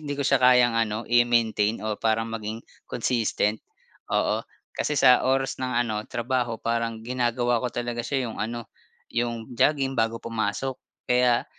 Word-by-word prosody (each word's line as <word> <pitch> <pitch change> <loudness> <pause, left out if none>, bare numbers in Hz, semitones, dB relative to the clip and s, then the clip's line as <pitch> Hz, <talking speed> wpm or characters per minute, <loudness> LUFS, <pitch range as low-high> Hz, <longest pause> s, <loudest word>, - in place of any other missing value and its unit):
hindi 145 -2 -4
ko 140 - -2
siya 140 0 +3
kayang 125 -1 +6
ano 115 0 -1
i-maintain. 115 -3 +2
Oh, 110 -1 -3
parang 115 0 0
maging 110 0 -5 0.2
consistent, 110 -3 0 0.5
oo. - - +1 0.3
Kasi 150 - -2
sa 125 -2 +6
oras 135 +1 0
ng 130 -1 -2
ano 110 -2 -2
trabaho 120 -1 -1
parang 115 -1 -2
ginagawa 120 -1 0
ko 125 - -1
talaga 120 0 -3
siya 130 +2 -1
yung 115 -2 -6
ano, 115 +2 -3 0.5
yung 120 -1 -2
jogging 140 -1 +2
bago 115 0 +1
pumasok 115 +3 -3 0.3
kaya 125 -1 +3
120 Hz, 150 wpm, -25 LUFS, 115-125 Hz, 0.5 s, kayang